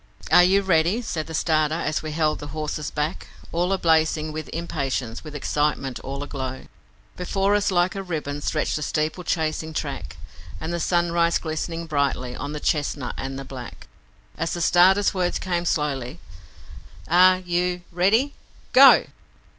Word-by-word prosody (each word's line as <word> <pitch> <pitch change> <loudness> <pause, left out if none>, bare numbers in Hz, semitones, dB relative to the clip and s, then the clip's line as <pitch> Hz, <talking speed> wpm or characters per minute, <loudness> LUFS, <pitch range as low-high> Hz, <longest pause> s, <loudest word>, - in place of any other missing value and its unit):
'Are 180 - +8
you 195 +2 +4
ready?' 185 +5 +2
said 160 -8 -3
the 160 - -5
starter, 155 -1 +1
as 155 -2 -1
we 155 - -5
held 155 0 0
the 145 - -7
horses 150 -1 -3
back, 150 +3 -3 0.2
All 175 +3 0
ablazing 160 -4 +2
with 155 0 -6
impatience, 135 -8 -3
with 155 -2 -9
excitement 145 -3 -1
all 140 +1 -5
aglow; 130 -2 -5 0.5
Before 195 +2 0
us 205 0 +2
like 180 -1 +2
a 195 - -4
ribbon 150 -6 -4
stretched 155 +1 -1
the - - -5
steeplechasing 160 0 -2
track, 75 - -4 0.4
And 160 +2 -4
the 170 - -2
sun 170 0 +1
rays 170 0 +2
glistened 165 +1 -4
brightly 140 -4 -1
on 145 - -5
the 150 - -4
chestnut 145 -4 -1
and 135 0 -5
the 135 - -7
black 130 -2 -9 0.5
As 165 +1 -1
the 175 - -3
starter's 185 +4 +4
words 180 -2 0
came 175 -2 -2
slowly, 140 -6 -1 0.9
'Are 185 +2 +6
you 180 0 -1
ready? 210 +11 +2 0.4
Go!' - - +8
160 Hz, 155 wpm, -24 LUFS, 150-175 Hz, 0.9 s, Are